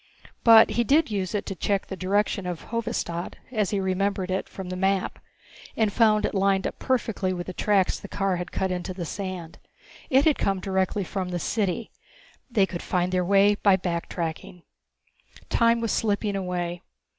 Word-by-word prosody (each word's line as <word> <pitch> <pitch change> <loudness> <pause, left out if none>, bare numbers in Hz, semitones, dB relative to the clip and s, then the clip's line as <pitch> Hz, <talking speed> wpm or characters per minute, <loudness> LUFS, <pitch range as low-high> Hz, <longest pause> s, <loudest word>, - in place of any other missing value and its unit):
But 225 -1 +8
he 235 - +1
did 290 +2 +3
use 195 -2 -2
it 205 - -2
to 195 - -4
check 200 +2 0
the 190 - -6
direction 195 0 0
of 175 -2 -6
Hovedstad, 225 -7 -3 0.2
as 215 -5 0
he 205 - 0
remembered 190 0 -1
it 190 - -2
from 190 -2 -7
the 185 - -3
map, 190 0 0 0.6
and 215 -3 +2
found 215 -2 +4
it - - -2
lined 195 -1 +2
up - - -4
perfectly 225 -7 0
with 175 -1 -4
the 185 - -6
tracks 195 -1 +1
the - - -9
car 195 -2 -1
had 180 0 -5
cut 190 -1 -1
into 180 +1 -4
the 175 -2 -4
sand. 185 -2 -6 0.5
It 270 +2 +4
had 310 -3 +3
come 195 -1 +1
directly 190 +1 0
from 185 0 -4
the 175 - -2
city. 205 +4 -1 0.6
They 215 -6 +3
could 175 -2 -6
find 180 0 0
their 185 -1 +1
way 200 +2 +5
by 200 -1 +4
back 175 -2 -3
tracking. 170 +1 -5 0.9
Time 230 0 +3
was 230 - -1
slipping 205 -2 0
away. 175 -2 -3
195 Hz, 185 wpm, -25 LUFS, 180-210 Hz, 0.9 s, But